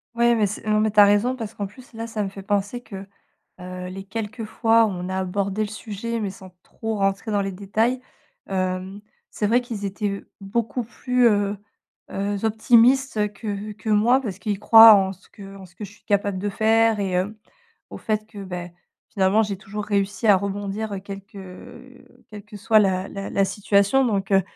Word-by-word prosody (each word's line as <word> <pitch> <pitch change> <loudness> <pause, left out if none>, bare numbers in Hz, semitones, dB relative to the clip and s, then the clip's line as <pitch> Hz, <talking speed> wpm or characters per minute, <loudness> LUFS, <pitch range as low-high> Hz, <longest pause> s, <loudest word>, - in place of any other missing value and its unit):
Ouais 235 0 +3
mais 215 -2 +2
c'est 205 +2 -5
non, 215 0 +3
mais 215 0 +1
tu 210 - +3
as 205 - +10
raison 205 +5 +2
parce 225 -4 -7
qu'en 205 - -3
plus 245 +7 -14
là 225 0 -5
ça 225 -2 -4
me 195 - -3
fait 195 0 -10
penser 205 +4 -1
que, 195 -4 -9 0.5
heu, 180 0 -7
les 195 +1 -8
quelques 225 +2 -5
fois 225 +1 +3
où - - -1
on 180 -2 -5
a 190 - -2
abordé 195 +2 -2
le 215 - 0
sujet 220 +2 -5
mais 205 -3 -2
sans 190 -1 -12
trop 220 -1 -5
rentrer 195 +2 -1
dans 205 -1 +1
les 195 0 -3
détails. 220 +6 -1 0.5
Hem, 185 +1 -3 0.3
c'est 210 - -2
vrai 235 +4 +3
qu'ils 230 -5 -6
étaient 200 0 -3 0.2
beaucoup 230 +5 -2
plus, 250 +2 0
heu 205 -1 0 0.5
heu, 200 0 -3
optimistes 225 0 +3
que 205 0 -5
que 220 +1 -6
moi 220 +5 +4
parce 200 -7 -5
qu'ils 205 0 -3
croient 225 +1 +9
en 190 -1 +2
ce 190 - -19
que 195 -2 -12
en 190 -1 -11
ce 175 - -24
que 210 - -8
je 200 - -10
suis 205 - -23
capable 200 -2 0
de 205 +2 -2
faire 220 +1 +2
et 195 -1 -1
hem, 185 +4 -1 0.5
au - - -8
fait, 215 -1 -2
que, 210 -2 -10
beh, 180 -2 -6 0.4
finalement 195 +2 +2
j'ai 200 -3 -3
toujours 210 +1 -6
réussi 200 +1 -1
à 205 -3 +7
rebondir 200 +1 -4
quelque, 200 +1 -10
heu, 185 -1 -14
quelque 210 0 -11
soit 215 +2 +3
la 190 -2 +1
la 195 0 -6
la 195 - +2
situation 200 +6 +2
donc 200 -3 -1
heu, 195 0 +5
205 Hz, 205 wpm, -23 LUFS, 195-220 Hz, 0.5 s, as